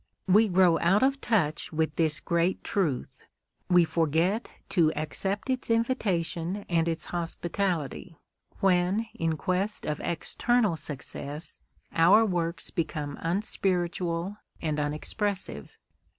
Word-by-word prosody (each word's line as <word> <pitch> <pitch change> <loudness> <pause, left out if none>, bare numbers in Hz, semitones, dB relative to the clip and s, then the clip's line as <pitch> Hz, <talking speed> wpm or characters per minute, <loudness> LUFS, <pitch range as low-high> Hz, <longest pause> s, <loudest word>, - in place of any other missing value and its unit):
We 210 +4 +6
grow 180 -3 +4
out 190 +7 +3
of 275 +1 +2
touch 160 -10 0
with 160 -1 0
this 160 -2 +1
great 170 +2 0
truth, 165 - -1 0.5
we 175 -1 +6
forget 165 +6 +1 0.2
to 165 -4 +3
accept 195 - -2
its 255 -2 -1
invitation 200 -6 0
and 165 -1 +2
its 165 -1 -2
hospitality, 170 -2 -2 0.4
when 190 +3 +3
in 165 -1 -1
quest 185 +6 -1
of 150 -1 -2
external 215 +3 +1
success 145 +1 -6 0.3
our 185 +7 +6
works 175 -3 -2
become 150 -4 -3
unspiritual 180 0 -1 0.2
and 155 -2 -1
unexpressive. 150 - -3
175 Hz, 110 wpm, -28 LUFS, 160-200 Hz, 0.5 s, We